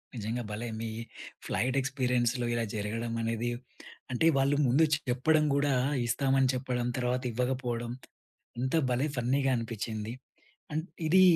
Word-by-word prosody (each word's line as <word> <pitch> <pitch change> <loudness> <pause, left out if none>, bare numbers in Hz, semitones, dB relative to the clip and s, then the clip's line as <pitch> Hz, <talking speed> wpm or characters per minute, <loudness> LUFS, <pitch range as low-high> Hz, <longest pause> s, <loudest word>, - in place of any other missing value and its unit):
నిజంగా, 115 +2 -2
భలే 110 +3 -3
మీ 115 - -3 0.6
ఫ్లైట్ 130 +3 0
ఎక్స్పీరియన్స్‌లో 125 -2 +1
ఇలా 120 0 +1
జరగడం 115 +3 -2
అనేది, 115 +1 -1 0.6
అంటే 125 +7 +3
వాళ్ళు 135 +1 +3
ముందు 140 +7 +5 0.2
చెప్పడం 150 +5 +3
కూడా, 140 -1 +2 0.3
ఇస్తామని 135 +1 +3
చెప్పడం, 125 -1 -1
తర్వాత 125 +1 0
ఇవ్వకపోవడం. 120 -1 -1 0.7
ఎంత 130 +4 0 0.2
భలే 125 +5 +2
ఫన్నీగా 135 +3 +2
అనిపించింది. 115 -1 -4 0.6
అండ్ 160 +3 -1 0.2
ఇది... 185 +4 +7
125 Hz, 120 wpm, -30 LUFS, 115-135 Hz, 0.7 s, ఇది